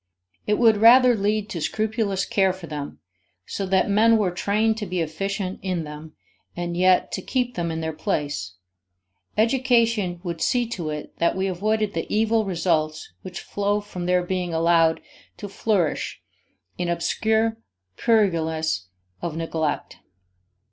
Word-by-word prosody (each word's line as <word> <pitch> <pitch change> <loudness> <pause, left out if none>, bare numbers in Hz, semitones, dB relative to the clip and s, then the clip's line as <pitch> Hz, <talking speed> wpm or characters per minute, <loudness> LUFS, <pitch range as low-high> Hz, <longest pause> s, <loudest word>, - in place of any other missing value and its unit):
It 210 - +3
would 225 -3 +5
rather 245 +3 +7
lead 210 0 0
to 170 - -4
scrupulous 215 +1 -1
care 190 -2 +2
for 185 -2 -9
them, 145 - -6 0.5
so 195 - -4
that 190 0 +2
men 220 +3 +4
were 200 -4 +1
trained 210 +5 +1
to 210 - -4
be 180 0 -2
efficient 190 +4 -3
in 185 -3 -2
them 150 +1 -9 0.4
and 175 0 -3
yet 185 +1 +3
to - - -3
keep 250 -2 -1
them 170 -4 -2
in 165 0 -3
their 160 0 -3
place; 145 - -3 0.8
education 230 -6 +2
would 170 -3 -4
see 245 -1 +2
to 175 -9 -4
it 150 -1 -6
that 170 - +2
we 190 - 0
avoided 210 +3 0
the - - -4
evil 220 0 +2
results 165 - -1
which 185 - -7
flow 205 +1 -1
from 185 -4 -6
their 180 0 +2
being 180 -1 -2
allowed 165 0 +3 0.4
to 205 - -6
flourish 195 -5 -1 0.6
in 175 -1 -1
obscure 220 +6 +1 0.4
purlieus 160 - +1 0.3
of 165 -2 -4
neglect. 160 -2 -2
185 Hz, 150 wpm, -24 LUFS, 165-215 Hz, 0.8 s, rather